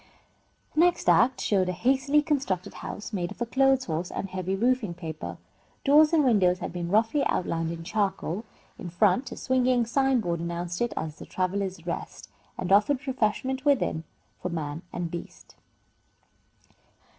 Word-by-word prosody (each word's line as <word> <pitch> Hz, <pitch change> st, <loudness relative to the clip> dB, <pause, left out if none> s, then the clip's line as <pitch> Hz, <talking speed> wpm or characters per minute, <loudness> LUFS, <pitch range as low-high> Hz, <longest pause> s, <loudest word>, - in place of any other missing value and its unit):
The -, -, -1 dB
next 350 Hz, +1 st, +3 dB
act 255 Hz, +2 st, +4 dB
showed 190 Hz, -3 st, +2 dB
a -, -, -1 dB
hastily 270 Hz, +7 st, +2 dB
constructed 265 Hz, -, -1 dB
house 210 Hz, -, -7 dB
made 175 Hz, -3 st, -1 dB
of -, -, -11 dB
a 240 Hz, -, 0 dB
clothes 265 Hz, +2 st, +3 dB
horse 165 Hz, +2 st, -3 dB
and -, -, -4 dB
heavy 185 Hz, 0 st, -2 dB
roofing 230 Hz, -4 st, +1 dB
paper. 160 Hz, -3 st, -6 dB, 0.5 s
Doors 300 Hz, +2 st, +6 dB
and 315 Hz, -4 st, +4 dB
windows 190 Hz, -7 st, +4 dB
had -, -, -6 dB
been 175 Hz, -1 st, -3 dB
roughly 225 Hz, +8 st, +2 dB
outlined 165 Hz, -2 st, -1 dB
in 165 Hz, 0 st, -6 dB
charcoal. 200 Hz, 0 st, -1 dB, 0.4 s
In 175 Hz, -, -6 dB
front, 200 Hz, +7 st, +2 dB
a -, -, -7 dB
swinging 255 Hz, -2 st, +2 dB
sign 265 Hz, +2 st, +2 dB
board 170 Hz, -5 st, -2 dB
announced 170 Hz, +2 st, -4 dB
it 240 Hz, -, +1 dB
as 160 Hz, -1 st, -4 dB
the -, -, -9 dB
"Traveller's 190 Hz, +1 st, -2 dB
Rest" -, -, -6 dB, 0.3 s
and 180 Hz, -, -3 dB
offered 255 Hz, +7 st, +3 dB
refreshment 260 Hz, +1 st, -1 dB
within 270 Hz, -, +1 dB, 0.4 s
for 180 Hz, -, -2 dB
man 155 Hz, -2 st, -4 dB
and 175 Hz, -2 st, -4 dB
beast. 170 Hz, -, -9 dB
205 Hz, 160 wpm, -27 LUFS, 175-260 Hz, 0.5 s, Doors